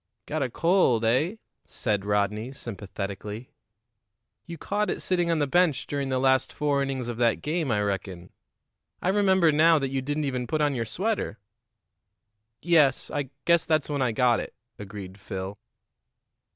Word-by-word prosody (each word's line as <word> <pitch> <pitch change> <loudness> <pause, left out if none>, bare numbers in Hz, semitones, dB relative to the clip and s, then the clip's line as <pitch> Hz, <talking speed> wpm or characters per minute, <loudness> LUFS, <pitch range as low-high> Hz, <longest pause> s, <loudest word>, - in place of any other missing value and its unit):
"Got - - -3
a 130 - 0
cold, 150 - +2
eh?" 140 - +2 0.3
said 105 -4 -2
Rodney 105 +4 0
sympathetically. 105 -1 -6 1.0
"You 170 - -7
caught 210 +6 -1
it - - -2
sitting 175 -2 0
on 165 - +2
the 145 - +2
bench 160 -1 +2
during 140 -1 -3
the 130 - 0
last 130 0 +2
four 145 -2 0
innings 135 -3 -2
of 120 -2 -4
that 120 -1 +1
game, 155 -1 -1
I 105 -3 +1
reckon. 95 -3 -4 0.7
I 180 - -1
remember 190 -4 +4
now 160 +2 +5
that 135 -2 -1
you 135 -1 -1
didn't 145 +3 -2
even 125 -3 -2
put 155 - -1
on 145 -1 +2
your 115 -3 -2
sweater." 195 - -2 1.3
"Yes, 155 -5 +3
I 145 -3 -2 0.2
guess 170 -2 +3
that's 155 -2 +1
when 145 -2 -1
I 125 -2 +2
got 120 +1 +3
it," - - -7 0.2
agreed 100 -1 -8
Phil. 95 +1 -6
135 Hz, 165 wpm, -26 LUFS, 110-155 Hz, 1.3 s, now